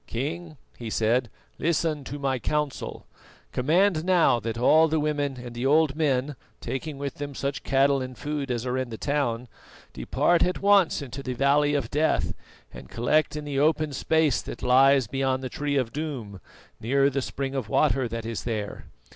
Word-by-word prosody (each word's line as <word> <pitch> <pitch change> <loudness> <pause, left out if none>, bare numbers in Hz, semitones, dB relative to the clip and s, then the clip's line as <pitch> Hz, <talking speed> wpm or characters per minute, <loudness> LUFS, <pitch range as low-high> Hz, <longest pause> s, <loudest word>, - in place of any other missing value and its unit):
"King," 155 +6 -4 0.2
he 115 -2 -5
said, 115 +3 +1 0.3
"listen 155 -2 0
to 145 - -6
my 135 -2 -1
counsel: 150 +1 -3 0.5
Command 160 +5 +2
now 175 -9 +4
that 115 +1 -4
all 155 +7 +5
the 160 0 0
women 145 -3 -1
and 120 -1 -8
the 120 +3 -1
old 150 0 +3
men, 145 -2 0 0.2
taking 135 +4 -5
with 140 0 -5
them 145 -1 -5
such 140 +1 -3
cattle 135 0 +2
and 130 -1 -6
food 145 -2 -4
as 120 -1 -2
are 125 +1 -1
in 130 -2 -3
the 110 - -6
town, 125 -4 -1 0.5
depart 175 -1 +1
at 180 - +1
once 200 -6 +3
into 135 +1 -7
the 130 -2 -4
Valley 145 +3 +2
of 145 - -2
Death 155 +2 +1 0.4
and - - -11
collect 150 +6 +1
in 150 -1 -5
the 140 -2 -2
open 155 0 +2
space 160 -1 +1
that - - -9
lies 135 +1 +5
beyond 130 +2 -1
the 130 - -3
Tree 145 +2 -2
of 125 -4 -1
Doom, 130 - -5 0.4
near 135 +5 +2
the 135 +1 -1
spring 135 +1 -4
of 130 -6 -3
water 135 0 +2
that 115 -1 -5
is 115 -1 -4
there. 110 -3 -4
140 Hz, 180 wpm, -26 LUFS, 125-150 Hz, 0.5 s, all